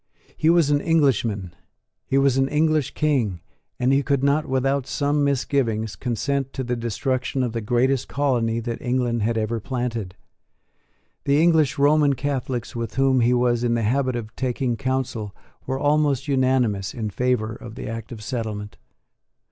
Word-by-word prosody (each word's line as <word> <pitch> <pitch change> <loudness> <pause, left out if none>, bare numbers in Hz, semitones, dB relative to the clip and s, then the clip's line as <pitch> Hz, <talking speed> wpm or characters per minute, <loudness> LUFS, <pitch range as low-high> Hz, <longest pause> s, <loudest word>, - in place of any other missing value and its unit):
He 155 - +2
was 165 -4 +4
an 145 0 +2
Englishman: 120 - +1 0.5
he 135 - +1
was 135 -2 +3
an 135 0 +2
English 155 -1 +1
King; 130 - +1 0.4
and 125 +2 +2
he 140 - +4
could 140 0 0
not, 145 +2 +2
without 135 0 0
some 145 0 0
misgivings, 125 -6 0
consent 135 +2 -2
to 130 - -3
the 125 0 -1
destruction 130 +3 -1
of 120 - -1
the 115 - -2
greatest 125 +4 +1
colony 120 -5 0
that 115 0 -4
England 120 -2 0
had 115 +2 0
ever 110 +1 -1
planted. 115 -5 -3 1.1
The 140 +1 +3
English 160 -5 +3
Roman 145 0 +4
Catholics 130 -3 -3
with 115 -3 -4
whom 135 -1 +3
he 120 +1 +3
was 120 -1 +1
in 120 -1 +2
the 115 - 0
habit 130 +3 +1
of 115 -2 -6
taking 125 -1 -1
counsel 130 -5 -3 0.3
were 130 0 -1
almost 145 -1 +1
unanimous 130 -8 +1
in 110 -3 -3
favour 125 -3 0
of 115 0 -10
the - - -6
Act 115 0 -6
of 110 -3 -8
Settlement. 110 -4 -4
125 Hz, 165 wpm, -23 LUFS, 115-140 Hz, 1.1 s, was